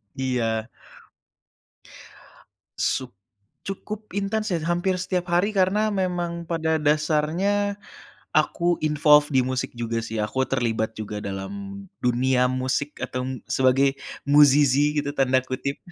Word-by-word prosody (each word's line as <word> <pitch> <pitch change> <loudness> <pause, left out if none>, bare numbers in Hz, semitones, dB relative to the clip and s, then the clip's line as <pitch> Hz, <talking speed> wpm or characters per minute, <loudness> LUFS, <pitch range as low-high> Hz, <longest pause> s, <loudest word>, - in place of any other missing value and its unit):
Iya. 120 -4 -1 2.1
Suk 130 -1 -1 0.5
cukup 210 +2 -7
intens 200 +2 -2
ya 170 - +1
hampir 175 +2 0
setiap 180 -1 -2
hari 195 +5 +2
karena 195 +3 +2
memang 180 -4 -2
pada 160 -1 -1
dasarnya 160 +7 +1 0.6
aku 170 +3 +2
involves 150 -1 +4
di 135 - +2
musik 130 0 -2
juga 115 -1 -2
sih, 110 0 -5
aku 110 +5 0
terlibat 110 -4 -1
juga 105 -1 -5
dalam 195 - -6 0.2
dunia 125 +1 +2
musik 130 +3 -2
atau 125 - -3 0.2
sebagai 135 +1 +3 0.3
"musisi" 145 0 +5
gitu 145 0 -2
tanda 130 -2 +3
kutip. 140 +2 -3
150 Hz, 115 wpm, -24 LUFS, 130-180 Hz, 2.1 s, musisi